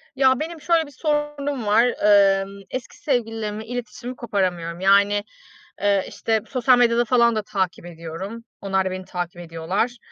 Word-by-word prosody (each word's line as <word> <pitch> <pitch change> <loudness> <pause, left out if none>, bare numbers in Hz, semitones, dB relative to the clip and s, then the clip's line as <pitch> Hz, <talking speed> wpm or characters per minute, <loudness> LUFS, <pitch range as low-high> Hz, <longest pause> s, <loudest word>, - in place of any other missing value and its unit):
Ya, 260 -1 +4
benim 320 +1 -5
şöyle 330 0 +2
bir - - -13
sorunum 290 -3 -2
var. 210 +3 +4 0.6
Imm, 195 +1 -8
eski 255 -2 -6
sevgililerimle 225 -6 -2
iletişimi 245 +1 -6
koparamıyorum. 180 -7 -2
Yani, 200 +2 +4 0.6
eee, 200 -1 +2
işte, 220 -1 -1
sosyal 255 -1 +4
medyada 240 0 +3
falan 235 -1 +4
da 215 - 0
takip 190 -4 -2
ediyorum. 175 +7 -7 0.2
Onlar 190 -1 0
da 190 - -1
beni 185 0 -6
takip 175 -1 -5
ediyorlar. 175 +9 -2
215 Hz, 150 wpm, -23 LUFS, 190-250 Hz, 0.6 s, Ya